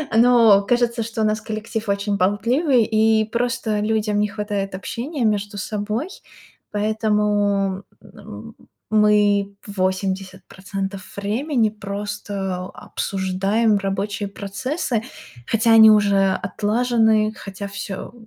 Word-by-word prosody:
но 230 -3 +6
кажется, 240 0 +1
что 225 0 -4
у - - +2
нас 215 0 0
коллектив 220 0 -5
очень 200 0 0
болтливый, 235 - +2
и 220 0 +2
просто 230 -1 -1
людям 210 -1 0
не 210 - +2
хватает 205 -2 -4
общения 250 - -4
между 205 -1 -1
собой, 210 - -3 0.6
поэтому, 205 -2 0 0.2
м, - - -12 0.4
мы 205 -2 +3
80% 190 0 -4
времени 225 +4 0
просто 200 -2 -5
обсуждаем 195 +4 -1
рабочие 200 +1 -3
процессы, 240 - -3 0.5
хотя 225 +1 +2
они 220 -1 +9
уже 200 -2 +4
отлажены, 220 0 +1
хотя 200 0 -7
всё 200 +2 -7
210 Hz, 100 wpm, -21 LUFS, 200-225 Hz, 0.6 s, они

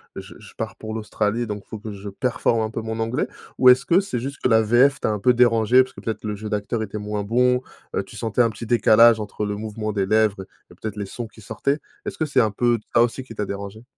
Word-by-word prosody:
je - - -9
je - - -14
pars - - -5
pour 110 0 -6
l'Australie, 110 +1 -1
donc 105 -2 -6
faut 110 - -7
que 105 +1 -8
je 100 0 -9
performe 115 +2 0
un 110 - -1
peu 115 - -5
mon 110 0 -4
anglais»? 115 +3 -1 0.3
Ou 130 - +4
est-ce 125 0 +7
que 175 +5 +4
c'est 190 -11 -3
juste 140 +4 -6
que - - +2
la 110 -2 +5
VF 125 +5 +3
t'as - - 0
un 105 - -2
peu 125 +4 +4
dérangée? 120 +1 +5
Parce 130 - -12
que - - -11
peut-être 110 -2 -4
le 105 -1 -3
jeu 105 +1 -7
d'acteur 105 +2 -2
était 105 0 -6
moins 105 0 -3
bon, 125 +4 +2 0.4
heu, - - 0
tu - - -14
sentais 115 +1 0
un 115 - +4
petit 110 +2 -8
décalage 115 0 +5
entre 105 0 -4
le 105 0 -3
mouvement 110 0 -4
des 100 -2 0
lèvres 105 -2 +1 0.3
et - - -13
peut-être 110 -2 -4
les 105 -1 -4
sons 115 +4 -6
qui 110 - -17
sortaient. 140 +7 -2 0.3
Est-ce - - -5
que 160 - 0
c'est 140 -3 +1
un 110 -3 +3
peu 120 +2 +1 0.2
ça 115 - +6
aussi 120 +2 -2
qui 115 -3 -12
t'a 105 - -2
dérangé? 100 +3 -7
110 Hz, 265 wpm, -22 LUFS, 105-120 Hz, 0.4 s, est-ce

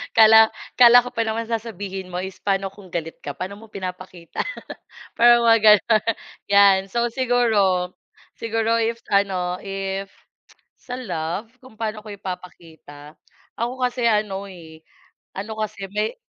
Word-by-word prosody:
Kala 220 0 +8 0.3
kala 245 0 +8
ko 250 - -7
pa 230 -2 -2
naman 225 +1 -3
sasabihin 200 -4 -5
mo 180 +1 -4
is 190 -1 -8
pano 195 -1 -1
kung 200 -1 -15
galit 165 -2 -5
ka, 145 -1 -7
paano 190 +5 -6
mo 225 - -14
pinapakita 185 -3 -8 0.8
parang 240 0 +6
mga 230 -1 +5 0.2
ganun 220 0 +1 0.4
yan 200 -1 +6
so 235 +4 -1
siguro 220 -8 +1 0.5
siguro 225 0 0
if 230 +1 -1
ano, 185 -3 +1
if 195 0 -4 0.7
sa 250 - -7
love 180 +1 -4
kung 255 -4 -16
paano 215 -1 -3
ko 210 - -8
ipapakita, 165 -6 -10 0.4
ako 250 +3 -2
kasi 245 -1 0
ano 210 -3 0
eh, 165 -4 -13 0.6
ano 220 +3 -5
kasi 215 -2 -4
may 210 - -2
200 Hz, 140 wpm, -22 LUFS, 185-230 Hz, 0.8 s, Kala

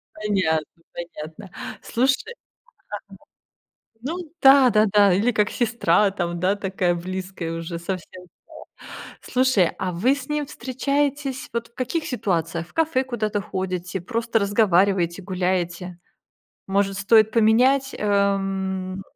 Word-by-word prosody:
Понятно, 175 -7 -1
понятно. 170 +2 -8 0.3
Слушай, 265 - 0
ага. - - -25 1.7
Ну 310 +8 -3 0.2
да, 270 -1 +7
да-да. 210 -3 +4
Или 210 +7 +2
как 210 -2 +1
сестра 215 -4 +2
там, 175 -3 -3
да, 190 +3 +2
такая 190 -3 0
близкая 185 -1 -5
уже 165 0 -5
совсем 180 +1 -6 0.7
стала. - - -10
Слушай, 255 -8 +2
а 185 -1 -2
вы 230 +11 +2
с 285 +1 -9
ним 300 -1 -1
встречаетесь 275 +1 -2
вот 235 0 -2
в 235 - -36
каких 260 +7 -2
ситуациях? 170 - -2
В - - -24
кафе 320 -5 +1
куда-то 215 -5 -2
ходите, 185 -1 -4
просто 230 +4 -1
разговариваете, 195 -3 +2
гуляете? 180 -1 -2 0.7
Может, 195 0 +1
стоит 215 +2 +5
поменять, 250 +5 +3
эм, 195 -2 0
200 Hz, 120 wpm, -23 LUFS, 180-240 Hz, 1.7 s, да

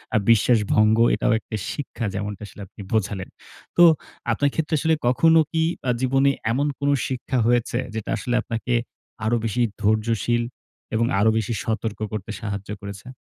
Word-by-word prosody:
আ - - +6
বিশ্বাস 115 +1 +4
ভঙ্গ 110 +1 +4 0.2
এটাও 120 - +1
একটা 110 - -7 0.2
শিক্ষা 125 -5 -5
যেমনটা 105 0 -4
আসলে 100 - -12
আপনি 100 - -13
বোঝালেন। 100 -3 -1 0.5
তো 175 - +8 0.5
আপনার 145 +5 +2
ক্ষেত্রে 160 0 0
আসলে 160 +2 +2
কখনো 160 +7 +5
কি 160 -1 +1 0.3
আ - - +5
জীবনে 135 +2 +3 0.2
এমন 140 +5 +1
কোনো 140 0 +2 0.2
শিক্ষা 130 0 -2
হয়েছে? 120 -1 +1 0.2
যেটা 110 - -4
আসলে 120 +3 -2
আপনাকে 115 +2 -3 0.5
আরো 115 +2 +2
বেশি 120 +3 0 0.2
ধৈর্যশীল 115 +2 +1 0.5
এবং 115 +1 +2
আরো 110 +2 +4
বেশি 110 +1 -1
সতর্ক 110 -1 -2
করতে 110 0 -4
সাহায্য 100 -2 -5
করেছে? 100 +4 -8
115 Hz, 160 wpm, -23 LUFS, 110-130 Hz, 0.5 s, তো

